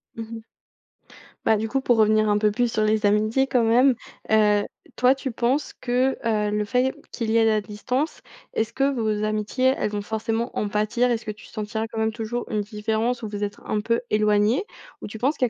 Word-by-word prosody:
Mmh 225 -1 -5
mh. 225 -1 -7 1.0
Bah, 220 - +4
du 220 +1 -2
coup 270 +4 -1
pour 240 -3 +2
revenir 215 0 +4
un 205 - +3
peu 210 0 +2
plus 240 +1 0
sur 215 - +1
les 215 0 +2
amitiés 215 +6 +2
quand 245 -4 +2
même, 250 +3 +5 0.4
heu, 210 -1 +4 0.3
toi 250 +1 +5
tu 270 0 -5
penses 250 +6 0
que, 255 +2 0
heu, 210 -2 +1
le 210 - +1
fait 250 +4 +1 0.2
qu'il 225 -3 -2
y - - +1
ait 225 - +5
la 215 -1 +3
distance, 250 - -3 0.3
est-ce 220 0 -1
que 275 +1 +1
vos 215 -3 -1
amitiés, 215 +5 +1
elles - - -1
vont 205 -1 -2
forcément 225 +3 -3
en 205 - -1
pâtir? 235 +4 +1
Est-ce 225 -1 -2
que 215 - -2
tu 210 - -13
sentiras 220 +1 -4
quand 225 0 -6
même 220 0 0
toujours 235 +1 -4
une 210 -1 0
différence 220 +3 -2
où - - -2
vous 205 0 -4
êtes 205 - -3
un 210 - -1
peu 230 +2 +1
éloignés? 210 - +2 0.4
Ou - - -6
tu 220 - -8
penses 270 +7 +1
qu'il 255 - +1
y - - -1
220 Hz, 220 wpm, -24 LUFS, 210-245 Hz, 1.0 s, même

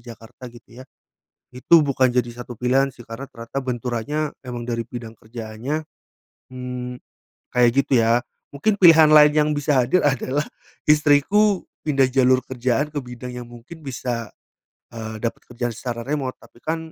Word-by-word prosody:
Jakarta, 115 +1 -11
gitu 120 +1 -15
ya. 130 - -10 0.7
Itu 160 +6 +5
bukan 130 -2 +2
jadi 125 -1 +1
satu 120 0 -9
pilihan 130 +2 +2
sih 120 -2 -14
karena 120 +5 -8
ternyata 115 +4 -6
benturannya 125 +5 -2
emang 120 -1 -6
dari 115 -1 -2
bidang 115 -2 -8
kerjaannya, 115 +7 -5 0.7
mmm, 125 -1 -6 0.6
kayak 125 -1 +5
gitu 130 -4 +3
ya. 115 +1 +3 0.3
Mungkin 200 +9 0
pilihan 165 -4 +8
lain 150 -1 +8
yang 150 0 +2
bisa 145 -2 +2
hadir 180 +9 +2
adalah 140 +1 0 0.4
istriku 155 +7 +4 0.2
pindah 135 -4 +3
jalur 130 0 +4
kerjaan 130 +2 -1
ke 145 - -2
bidang 125 0 -8
yang 120 - -7
mungkin 120 +8 -12
bisa, 120 -4 -4 0.6
eee, 110 -1 -6
dapat 115 - -3
kerjaan 120 0 -3
secara 120 0 -5
remote, 140 -3 -2
tapi - - -19
kan 160 +1 -1
125 Hz, 155 wpm, -22 LUFS, 120-145 Hz, 0.7 s, pilihan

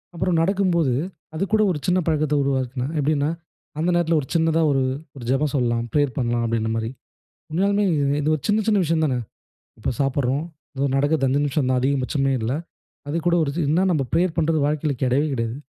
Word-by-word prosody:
அப்புறம் 170 0 0
நடக்கும்போது, 175 -6 +2 0.4
அது 160 - -1
கூட 215 - +4
ஒரு 150 - -3
சின்ன 180 +1 +3
பழக்கத்த 155 -2 +1
உருவாக்குனேன். 130 +1 -2
எப்பிடின்னா, 145 0 +1 0.5
அந்த 165 +3 +1
நேரத்துல 170 -1 +2
ஒரு 130 - -9
சின்னதா 165 0 +3
ஒரு 135 - +2 0.3
ஒரு 130 - -9
ஜெபம் 140 +3 +1
சொல்லலாம். 120 -3 +1
பிரேயர் 145 -1 +1
பண்ணலாம் 120 -2 0
அப்பபிடின்னமரி. 115 0 -1 0.6
உண்மையாலுமே, 200 +5 +1 0.4
இது 150 - -1
ஒரு 140 - -13
சின்ன 215 +1 +3
சின்ன 210 -3 +3
விஷயம் 160 0 +1
தானே! 130 -5 0 0.6
இப்போ - - -1
சாப்பிட்றோம், 135 +1 0 0.3
எதோ 135 +1 0
நடக்கிறது 145 0 +2
5 140 +3 +1
நிமிஷம் 145 -2 0
தான், 130 -1 +2
அதிகபட்சமே 135 +1 0
இல்ல. 110 +2 -1 0.6
அது 150 - -1
கூட 175 - +4
ஒரு 140 - -1
இது 165 0 -1
என்ன 170 - +3
நம்ம 150 -5 +1
பிரேயர் 170 +1 +1
பண்றது 160 -1 +2
வாழ்க்கையில 150 0 0
கிடையவே 130 +4 +2
கிடையாது. 115 -1 -2
145 Hz, 180 wpm, -22 LUFS, 130-165 Hz, 0.6 s, கூட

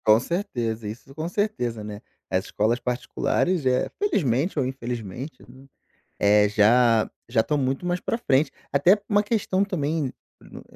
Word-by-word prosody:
Com 110 +1 +6
certeza, 120 - -3
isso 120 +6 -9
com 160 +3 -4
certeza, 150 - -2
né. 105 -1 -7 0.3
As 95 +2 0
escolas 115 +4 0
particulares 130 +6 -1
é, 130 -1 +2
felizmente 165 - +1
ou 135 - +2
infelizmente 125 - -6
num 130 +2 -16 0.5
eh, 105 0 +5
já 110 +2 +4 0.2
já 120 -1 +2
estão 150 +6 0
muito 135 +4 -1
mais 175 0 0
pra - - -1
frente. 145 - +2 0.2
Até 175 +9 +4
uma 205 -1 +3
questão 205 -3 0
também 165 -5 -1
n 130 - -3 0.3
no - - -12
130 Hz, 155 wpm, -24 LUFS, 115-175 Hz, 0.5 s, Com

